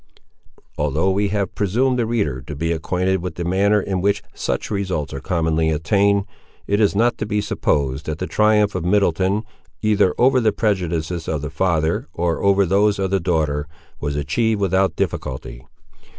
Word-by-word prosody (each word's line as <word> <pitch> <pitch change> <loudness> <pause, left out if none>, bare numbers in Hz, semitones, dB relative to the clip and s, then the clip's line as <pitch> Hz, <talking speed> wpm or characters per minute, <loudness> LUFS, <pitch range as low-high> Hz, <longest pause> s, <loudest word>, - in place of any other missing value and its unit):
Although 75 +6 +1
we 100 +2 +1
have 100 -1 -2
presumed 125 +6 +1
the 115 - +1
reader 90 - -1
to 75 - -8
be 85 +4 -1
acquainted 90 +3 0
with 90 -2 -5
the 85 - -4
manner 100 +4 +2
in 95 -2 -2
which 100 +1 +1
such - - -3
results 95 -8 -2
are - - -4
commonly 80 -2 0
attained, 100 +6 +2 0.4
it 100 +1 +1
is 105 -2 +3
not 120 +3 +2
to - - -1
be 105 -1 0
supposed 70 -7 -1
that 75 -1 -2
the 95 - -3
triumph 105 0 +2
of 90 - -3
Middleton, 95 +2 +1 0.4
either 105 -4 +3
over 130 +1 +4
the 110 -2 +3
prejudices 90 -6 -1
of 75 -2 -2
the 75 - -4
father 80 -2 0
or 85 -1 -1
over 100 0 +4
those 100 +3 +2
of 95 -1 -1
the 95 - +2
daughter, 80 -4 0 0.3
was 70 -1 -3
achieved 110 +9 0
without 95 0 +1
difficulty. 65 -1 -4
95 Hz, 175 wpm, -21 LUFS, 80-100 Hz, 0.4 s, over